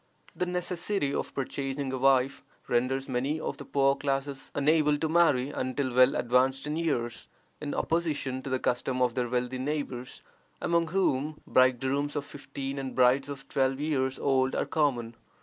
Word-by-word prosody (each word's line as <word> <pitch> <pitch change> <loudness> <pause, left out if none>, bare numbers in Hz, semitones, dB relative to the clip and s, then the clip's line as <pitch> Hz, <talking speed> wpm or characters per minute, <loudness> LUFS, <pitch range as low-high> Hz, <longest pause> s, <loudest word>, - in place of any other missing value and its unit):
The 180 - -1
necessity 180 -3 -1
of - - -2
purchasing 135 0 -3
a - - -1
wife 135 0 +3 0.2
renders 130 +3 0
many 135 +5 -1
of - - -4
the - - -9
poorer 135 -1 +3
classes 135 -1 -2
unable 150 +1 +3
to 160 - -1
marry 155 -5 +3
until 130 -1 -2
well 130 +1 +5
advanced 130 +3 +2
in 150 +1 -2
years, 120 -9 -2 0.3
in 145 -1 -3
opposition 150 -6 -1
to 135 - -6
the 130 - +1
custom 125 +1 -1
of 125 -2 +2
their 125 -1 -1
wealthy 125 +1 -1
neighbors, 130 -3 -4 0.4
among 170 -1 +1
whom 155 -4 0
bridegrooms 130 +3 +2
of 145 - -2
fifteen 140 -1 -6
and 135 -1 -5
brides 130 +2 +4
of 135 -1 -7
twelve 135 0 +1
years 135 -3 0
old 130 -1 +1
are - - 0
common. 125 -7 0
135 Hz, 165 wpm, -29 LUFS, 130-145 Hz, 0.4 s, well